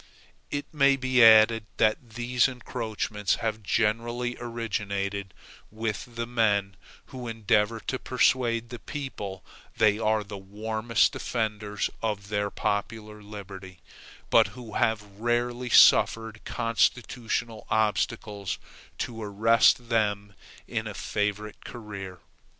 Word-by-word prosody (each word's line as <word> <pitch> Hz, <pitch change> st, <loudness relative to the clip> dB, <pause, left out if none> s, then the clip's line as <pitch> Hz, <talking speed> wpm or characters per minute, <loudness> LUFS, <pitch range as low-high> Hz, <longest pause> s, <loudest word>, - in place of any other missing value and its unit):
It 145 Hz, 0 st, -3 dB
may 140 Hz, -2 st, +4 dB
be 130 Hz, -2 st, +3 dB
added 110 Hz, 0 st, +7 dB
that 110 Hz, +1 st, +1 dB
these 120 Hz, +1 st, +2 dB
encroachments 110 Hz, -5 st, -2 dB
have 110 Hz, -1 st, -3 dB
generally 115 Hz, +4 st, 0 dB
originated 100 Hz, -4 st, -3 dB, 0.4 s
with 110 Hz, +2 st, -4 dB
the 115 Hz, 0 st, -2 dB
men 105 Hz, -5 st, +1 dB, 0.4 s
who 125 Hz, -2 st, -6 dB
endeavor 110 Hz, 0 st, +1 dB
to 130 Hz, -, -3 dB
persuade 120 Hz, -2 st, +1 dB
the 120 Hz, -1 st, -7 dB
people 105 Hz, -10 st, -6 dB, 0.3 s
they 105 Hz, -1 st, +4 dB
are 110 Hz, -1 st, +1 dB
the 100 Hz, -1 st, -8 dB
warmest 110 Hz, +3 st, 0 dB
defenders 105 Hz, -3 st, -2 dB
of 105 Hz, -3 st, -2 dB, 0.3 s
popular 105 Hz, +1 st, -3 dB
liberty, 100 Hz, -3 st, -10 dB, 0.5 s
but -, -, +6 dB
who 115 Hz, -4 st, -9 dB
have 110 Hz, -2 st, +1 dB
rarely 120 Hz, +4 st, -2 dB
suffered 110 Hz, -1 st, +5 dB
constitutional 115 Hz, -1 st, -1 dB
obstacles 105 Hz, -2 st, -1 dB, 0.4 s
to 115 Hz, -2 st, -4 dB
arrest 115 Hz, +3 st, +3 dB
them 105 Hz, -3 st, 0 dB, 0.3 s
in -, -, -3 dB
a -, -, -6 dB
favorite 105 Hz, +1 st, -3 dB
career. 100 Hz, -6 st, -8 dB
110 Hz, 110 wpm, -27 LUFS, 105-120 Hz, 0.5 s, added